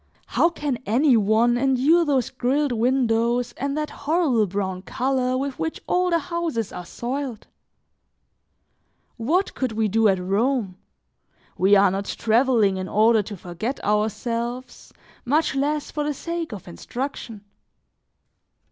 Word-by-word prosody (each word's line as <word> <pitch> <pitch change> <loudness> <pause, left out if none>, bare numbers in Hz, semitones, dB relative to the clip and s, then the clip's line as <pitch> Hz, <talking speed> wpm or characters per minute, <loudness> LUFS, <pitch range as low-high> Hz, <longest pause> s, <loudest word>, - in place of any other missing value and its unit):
How 335 - +2
can 290 -7 -3
any 255 +5 +4
one 225 +3 +3
endure 270 +6 +3
those 270 -5 0
grilled 265 +3 0
windows 240 0 +1
and 280 +4 -3
that 300 0 -2
horrible 285 - +1
brown 190 -1 -3
color 255 +4 -1
with 275 0 -4
which 320 - -3
all 360 0 +1
the 340 - +3
houses 330 - -3
are 180 - -7
soiled? 255 -2 -5 1.7
What 320 - 0
could 255 -4 -2
we 220 0 +1
do 220 +2 +3
at 195 -2 +3
Rome? 200 +2 0 0.8
We 195 +2 +4
are 195 -1 +5
not 195 +1 -3
traveling 225 -4 +2
in 185 0 -4
order 220 +2 +4
to 205 0 -8
forget 180 +10 -5
ourselves, 230 +4 -2 0.3
much 295 +5 +1
less 290 +2 -1
for 300 - -2
the 295 -1 -2
sake 335 +1 -4
of 205 -5 -8
instruction. 230 - -6
245 Hz, 135 wpm, -23 LUFS, 215-280 Hz, 1.7 s, are